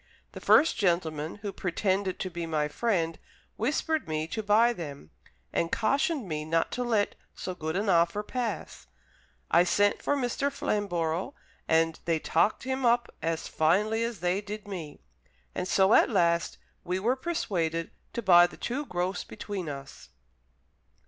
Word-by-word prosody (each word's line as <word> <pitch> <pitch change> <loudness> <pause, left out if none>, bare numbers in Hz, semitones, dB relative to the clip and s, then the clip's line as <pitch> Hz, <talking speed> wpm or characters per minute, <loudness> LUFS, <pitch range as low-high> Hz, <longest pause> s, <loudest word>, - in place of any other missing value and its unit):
The - - -9
first 325 - +5
gentleman, 165 -5 0
who 200 -2 -3
pretended 190 +1 -1
to 185 - -3
be 170 -1 -4
my 155 -2 0
friend, 165 -1 -1 0.4
whispered 295 - -1
me 155 0 -1
to 220 - -2
buy 220 +3 +4
them, 145 - -8 0.4
and 170 - 0
cautioned 275 - +1
me 155 -2 -3
not 165 +1 0
to 250 - -2
let 220 -4 +1 0.2
so 185 - -5
good 160 -2 -4
an 205 +3 0
offer 175 +3 +3
pass. 225 - -4 0.6
I 170 - +6
sent 205 +3 +2
for 285 - +1
Mr. 275 +2 -1
Flamborough, 185 - -1 0.3
and 165 0 +2
they 165 -1 +2
talked 165 +6 +1
him 260 +1 -2
up 240 0 +2
as 165 0 -2
finely 210 +8 +2
as 230 -6 -4
they 180 +3 +1
did 210 0 -7
me, 170 -7 -7 0.5
and 180 - -3
so 190 +3 +4
at - - +6
last 170 -5 +1 0.3
we 180 +1 -1
were 230 +7 +1
persuaded 175 - -2 0.2
to 235 - -3
buy 175 -2 +7
the - - -13
two 275 +4 -3
gross 180 +1 -2
between 190 -6 -6
us." 135 - -9
185 Hz, 155 wpm, -28 LUFS, 165-220 Hz, 0.6 s, buy